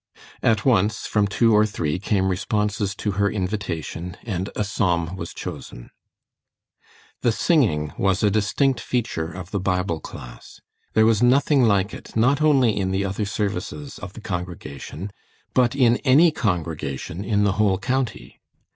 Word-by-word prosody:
At 110 -2 +2
once, 110 -4 +2
from 105 -1 +1
two 115 +3 +3
or 105 - +6
three 90 -6 -2
came 95 -1 +1
responses 105 +1 -1
to 105 - -2
her 100 - +3
invitation, 90 -4 -4
and 95 -4 -3
a - - 0
Psalm 90 -4 0
was 85 -2 -6
chosen. - - -8 1.3
The 120 - +3
singing 105 - +1
was 95 +1 +1
a 105 - +4
distinct 115 +5 +1
feature 105 -12 -2
of 95 +1 -8
the 100 - -1
Bible 90 -3 -1
class. - - -11 0.4
There 110 0 +5
was 110 -1 +3
nothing 135 +2 +4
like 100 -2 +2
it, - - -10
not 130 +6 +3
only 135 -8 +4
in 95 -2 -1
the 95 +1 0
other 100 +2 -2
services 105 +8 -4
of 100 -2 -8
the 115 - -10
congregation, 90 -1 -6 0.4
but 125 +1 +3
in 120 -3 +4
any 150 +5 +5
congregation 85 - -3
in 105 -1 +1
the 100 - +3
whole 100 -3 +3
county. 115 - -3
100 Hz, 155 wpm, -23 LUFS, 90-115 Hz, 1.3 s, or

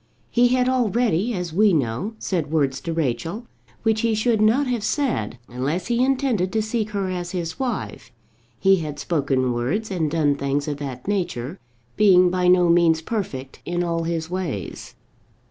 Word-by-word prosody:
He 245 0 +4
had 250 0 +2
already, 240 -4 +1
as 180 -3 -4
we 205 +2 +4
know, 140 - -1
said 170 -9 -2
words 140 -5 +1
to 165 - -4
Rachel 165 - -2 0.4
which 220 -1 +2
he 230 -2 +1
should 220 0 +1
not 230 +7 +4
have 245 -5 -1
said 225 - -1
unless 135 +9 -2
he 240 +2 +2
intended 255 -8 +1
to 220 - +2
seek 220 -1 -2
her 200 -3 -2
as 175 -1 -4
his 170 -3 -4
wife; 260 -2 -4 0.5
he 195 0 +4
had 150 -4 -5
spoken 135 -5 0
words 155 - -2
and 165 -5 0
done 150 -2 +2
things 140 +1 -1
of 145 -2 -2
that 135 -2 -7
nature, 175 -6 -2 0.4
being 185 -4 +6
by 180 0 +1
no 180 -1 +5
means 170 -1 +4
perfect 160 - -5
in 175 0 -1
all 165 -1 -1
his 165 -1 -2
ways. 170 - -5
180 Hz, 170 wpm, -23 LUFS, 150-215 Hz, 0.5 s, being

